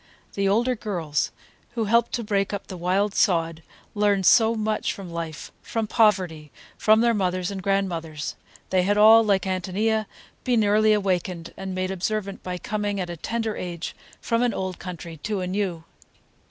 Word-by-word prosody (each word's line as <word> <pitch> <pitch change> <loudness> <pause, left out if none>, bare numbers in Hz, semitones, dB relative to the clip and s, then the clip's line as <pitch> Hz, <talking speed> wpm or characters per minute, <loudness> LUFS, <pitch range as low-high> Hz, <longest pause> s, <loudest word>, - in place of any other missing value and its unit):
The 195 -1 +1
older 240 +5 +2
girls, 170 -9 -2 0.4
who 235 -2 -1
helped 230 +2 +3
to 240 - -1
break 200 -1 0
up 200 - -4
the 190 - -8
wild 190 +4 0
sod, 165 -5 +1 0.3
learned 205 -3 +2
so 225 +4 +6
much 215 -1 -1
from 190 -3 -9
life, 165 -2 -6
from 225 -1 -2
poverty, 185 -9 +1 0.2
from 220 +1 +4
their 235 0 +3
mothers 185 -2 -1
and 195 -1 -5
grandmothers; 175 -6 -2 0.4
they 185 -1 +4
had 205 +3 +1
all, 220 +2 +8
like 200 -3 +2
Ántonia, 200 +4 0 0.4
been 240 -4 +2
early 215 +1 +4
awakened 180 -4 -1
and 190 -1 -5
made 185 0 -1
observant 200 +1 -3
by 180 -1 -4
coming 205 +1 -2
at 180 -2 -3
a - - -5
tender 225 +4 -2
age 175 -2 -5 0.2
from 230 0 0
an 245 -3 +1
old 185 -1 -4
country 170 -2 -7
to 205 +6 -3
a - - -2
new. 185 -3 -2
195 Hz, 170 wpm, -24 LUFS, 180-215 Hz, 0.4 s, all